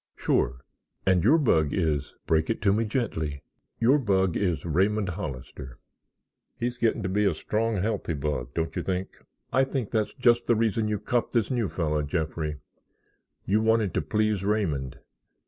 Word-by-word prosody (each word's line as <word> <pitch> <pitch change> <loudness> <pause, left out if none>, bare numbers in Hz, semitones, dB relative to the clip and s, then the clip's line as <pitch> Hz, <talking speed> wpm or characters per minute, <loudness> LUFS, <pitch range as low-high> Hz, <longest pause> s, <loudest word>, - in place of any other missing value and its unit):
"Sure; 65 +1 0 0.4
and 95 -2 +3
your 140 +10 +6
bug 80 - +3
is——" 75 -5 -1
"Break 80 -1 +1
it 115 - 0
to 100 -1 +4
me 115 +2 +1
gently." 80 - -2 0.4
"Your 130 +6 +4
bug 95 - +1
is 90 -5 0
Raymond 95 +5 +1
Hollister." 65 -7 -7 0.8
"He's 125 +1 -3
getting 115 -2 +1
to - - -1
be 105 +3 +1
a 95 -5 +2
strong, 110 +7 -1
healthy 100 -4 -1
bug, 70 -4 -3
don't 80 -1 -2
you - - -1
think?" 95 0 -3 0.3
"I 135 - +5
think 135 -5 -3
that's 110 -2 0
just 120 -2 +3
the 120 - +4
reason 110 0 +1
you 105 0 0
copped 120 +4 -1
this 115 -2 +1
new 120 -5 0
fellow, 75 -3 -1
Jeffrey. 80 0 -2 0.9
You 105 +3 +2
wanted 110 -3 +2
to - - +1
please 110 -2 0
Raymond. 85 -11 -1
100 Hz, 165 wpm, -27 LUFS, 80-115 Hz, 0.9 s, your